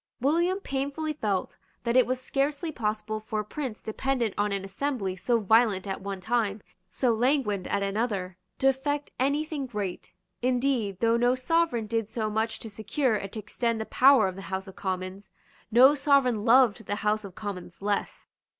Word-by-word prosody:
William 340 +8 +2
painfully 285 0 -3
felt 205 -10 -2 0.3
that 235 0 0
it 255 -2 +5
was 255 0 -1
scarcely 285 +4 -1
possible 215 -3 -2
for 215 0 -3
a - - -9
prince 260 -2 -5
dependent 235 -1 -1
on 205 0 0
an 195 -1 -2
assembly 195 -3 -2
so 235 +5 +1
violent 215 -2 +3
at 195 -1 -4
one 195 0 -5
time, 215 0 -1 0.3
so 245 +4 +1
languid 225 -5 +1
at 200 0 0
another, 200 -3 -2 0.2
to 270 - +2
effect 285 +2 0
any 285 +4 +1
thing 295 -4 -4
great. 205 -6 -5 0.3
Indeed, 245 -6 0
though 230 0 +3
no 245 +1 +3
sovereign 260 -3 +1
did 225 -1 -2
so 220 -1 -2
much 220 +1 -1
to 225 - -7
secure 220 +4 0
and 195 -2 -4
to - - -5
extend 230 +2 -2
the 220 - -3
power 260 -5 +5
of 185 - -4
the 195 +1 -9
House 190 +1 -3
of 190 - -11
Commons, 185 +1 -4 0.4
no 250 +5 +7
sovereign 265 -6 +2
loved 235 -3 +4
the 205 - -1
House 215 +1 +2
of 195 -3 -10
Commons 185 -4 -7
less. 205 0 -2
225 Hz, 180 wpm, -27 LUFS, 205-265 Hz, 0.4 s, no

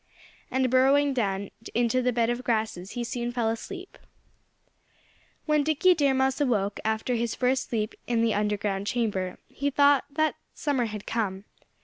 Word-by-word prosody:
And 260 -1 +1
burrowing 275 +2 +4
down 200 -5 -1 0.2
into 240 +2 +2
the 250 0 +2
bed 235 0 +1
of 240 +1 -3
grasses 215 -6 -1
he 240 - -3
soon 240 0 -3
fell 240 -2 0
asleep. 370 - -7 1.5
When 300 -1 +3
Dickie 315 +5 +4
Deer 285 -5 +2
Mouse 265 +2 +1
awoke, 210 -7 +1
after 220 +3 0
his 235 -1 -1
first 255 +1 0
sleep 215 -2 -1
in 230 -1 +1
the 225 -2 +2
underground 205 -1 -1
chamber, 205 -7 -1
he 285 +1 -2
thought 285 0 +4
that 310 0 +1 0.2
summer 275 -5 0
had 210 -2 -6
come. 200 -4 -2
240 Hz, 155 wpm, -27 LUFS, 215-265 Hz, 1.5 s, burrowing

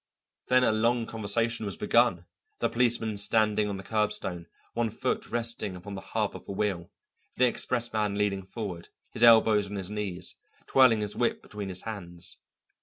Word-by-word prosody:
Then 125 0 +4
a - - +4
long 115 +2 +1
conversation 115 +1 -1
was 95 - -5
begun, 115 -8 +2 0.3
the - - 0
policeman 115 -3 +1
standing 105 0 +2
on 100 - -3
the 95 - -8
curbstone, 95 -5 -2 0.3
one 115 -1 0
foot - - -2
resting 115 -5 -1
upon 90 +3 -8
the 95 - -6
hub - - -2
of - - -10
a - - -5
wheel, 95 -4 -2 0.5
the 125 - +4
expressman 115 -4 0
leaning 100 -1 0
forward, 95 -3 -6 0.2
his - - -5
elbows 110 -3 +6
on 105 - -6
his 95 0 -4
knees, 105 -4 -4 0.3
twirling 125 -5 +5
his 105 0 -2
whip 120 - 0
between 105 -2 -6
his 90 -1 -2
hands. 90 -5 -6
105 Hz, 170 wpm, -28 LUFS, 100-115 Hz, 0.5 s, elbows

